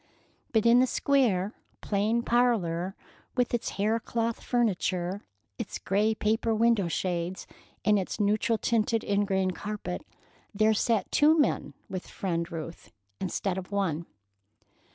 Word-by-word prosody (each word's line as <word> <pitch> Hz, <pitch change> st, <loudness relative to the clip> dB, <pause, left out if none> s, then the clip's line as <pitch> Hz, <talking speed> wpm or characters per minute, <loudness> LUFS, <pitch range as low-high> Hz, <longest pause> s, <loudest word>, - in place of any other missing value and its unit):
But 220 Hz, -1 st, +2 dB
in 235 Hz, +1 st, +7 dB
the 255 Hz, -, +4 dB
square, 225 Hz, -10 st, +2 dB, 0.3 s
plain 215 Hz, +3 st, +1 dB
parlor, 195 Hz, -8 st, +1 dB, 0.4 s
with 245 Hz, -1 st, +1 dB
its 235 Hz, -, 0 dB
hair 215 Hz, +3 st, +2 dB
cloth 230 Hz, 0 st, -2 dB
furniture, 190 Hz, -5 st, 0 dB, 0.4 s
its 230 Hz, -, -4 dB
gray 210 Hz, +3 st, +1 dB
paper 220 Hz, +1 st, +1 dB
window 225 Hz, -4 st, +3 dB
shades, 175 Hz, +1 st, -2 dB, 0.4 s
and 210 Hz, -1 st, +4 dB
its 190 Hz, -, -4 dB
neutral 215 Hz, +2 st, +2 dB
tinted 225 Hz, 0 st, +1 dB
ingrain 195 Hz, -2 st, +1 dB
carpet, 205 Hz, 0 st, -5 dB, 0.5 s
there 215 Hz, +1 st, +4 dB
sat 220 Hz, -2 st, +1 dB
two 310 Hz, +2 st, +5 dB
men 295 Hz, -, +1 dB
with 185 Hz, -1 st, -6 dB
Friend 170 Hz, -2 st, -3 dB
Ruth, 165 Hz, 0 st, -7 dB, 0.3 s
instead 190 Hz, 0 st, -2 dB
of 185 Hz, +1 st, -10 dB
one. 170 Hz, -5 st, -1 dB
210 Hz, 130 wpm, -28 LUFS, 185-230 Hz, 0.5 s, in